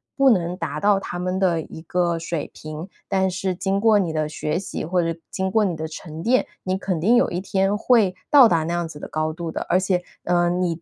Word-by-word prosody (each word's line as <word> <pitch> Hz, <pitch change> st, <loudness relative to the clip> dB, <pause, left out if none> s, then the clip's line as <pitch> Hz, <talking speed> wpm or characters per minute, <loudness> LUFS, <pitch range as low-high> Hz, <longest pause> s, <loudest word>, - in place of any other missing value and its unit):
不 275 Hz, -1 st, +5 dB
能 180 Hz, -6 st, +2 dB
达 165 Hz, -4 st, -4 dB
到 205 Hz, +3 st, +4 dB
他 175 Hz, -2 st, -6 dB
们 185 Hz, +1 st, -1 dB
的 180 Hz, -4 st, +2 dB
一 160 Hz, -, -10 dB
个 175 Hz, 0 st, 0 dB
水 165 Hz, -2 st, -4 dB
平， 155 Hz, +3 st, -7 dB, 0.2 s
但 190 Hz, 0 st, +2 dB
是 185 Hz, +1 st, -2 dB
经 195 Hz, +2 st, -1 dB
过 220 Hz, -2 st, +5 dB
你 175 Hz, -5 st, -1 dB
的 155 Hz, -1 st, -1 dB
学 150 Hz, +1 st, -2 dB
习， 190 Hz, -, -4 dB
或 180 Hz, +2 st, +1 dB
者 165 Hz, 0 st, -3 dB
经 190 Hz, 0 st, -2 dB
过 215 Hz, +1 st, +3 dB
你 180 Hz, -4 st, -1 dB
的 160 Hz, 0 st, -4 dB
沉 160 Hz, 0 st, -8 dB
淀， 255 Hz, +2 st, +3 dB, 0.2 s
你 185 Hz, 0 st, -1 dB
肯 185 Hz, -3 st, -2 dB
定 220 Hz, +8 st, +4 dB
有 -, -, +3 dB
一 175 Hz, -, -3 dB
天 195 Hz, +1 st, 0 dB
会 215 Hz, -5 st, +3 dB, 0.2 s
到 275 Hz, -5 st, +9 dB
达 165 Hz, -5 st, +2 dB
那 170 Hz, +2 st, -2 dB
样 175 Hz, -1 st, -1 dB
子 155 Hz, -, -10 dB
的 -, -, -7 dB
高 155 Hz, 0 st, -1 dB
度 165 Hz, 0 st, -5 dB
的。 -, -, -4 dB
而 185 Hz, -, +4 dB
且， 185 Hz, -1 st, 0 dB, 0.2 s
呃， 175 Hz, 0 st, +2 dB
你 175 Hz, -2 st, -1 dB
180 Hz, 260 characters per minute, -23 LUFS, 165-195 Hz, 0.2 s, 到